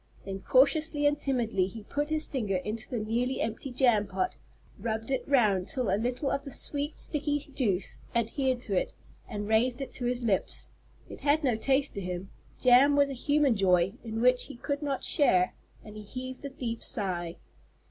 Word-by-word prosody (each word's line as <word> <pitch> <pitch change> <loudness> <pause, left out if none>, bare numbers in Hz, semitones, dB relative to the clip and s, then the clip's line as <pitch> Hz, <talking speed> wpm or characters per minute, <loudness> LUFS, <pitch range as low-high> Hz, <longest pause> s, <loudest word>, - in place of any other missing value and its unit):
Then, 195 -1 -5
cautiously 290 +6 +3
and 290 0 +4
timidly, 240 -10 0
he 220 +2 -9
put 290 +7 -2
his 310 0 0
finger 215 -8 -2
into 210 +4 -4
the 245 - -2
nearly 235 +4 -1
empty 225 +5 -3
jam 240 -5 +3
pot, 370 - -1 0.5
rubbed 225 +2 -3
it 265 - 0
round 210 -9 +3
till 250 -7 0
a - - +4
little 245 +6 -1
of 275 - -1
the 280 - -6
sweet, 285 +2 0
sticky 290 -1 -1
juice 205 -9 -1 0.2
adhered 250 +2 0
to 200 -5 -3
it, - - 0 0.4
and 205 -2 -4
raised 240 +4 +2
it 270 - -5
to 245 - -3
his 245 0 -1
lips. 205 -5 -1 0.4
It - - -10
had 300 +2 +2
no 250 -5 +2
taste 270 +5 +1
to 200 - -4
him. 180 +1 -5 0.3
Jam 260 +3 +6
was 285 -1 +3
a - - -3
human 285 0 +2
joy 185 -2 +3
in 225 -1 -4
which 250 0 +4
he - - -10
could 285 +4 -3
not 280 -3 -2
share, 185 - +3 0.3
and 210 -1 -11
he 215 - -7
heaved 255 +5 -7
a - - -3
deep 240 -4 -5
sigh. 175 -5 -1
245 Hz, 190 wpm, -29 LUFS, 210-275 Hz, 0.5 s, Jam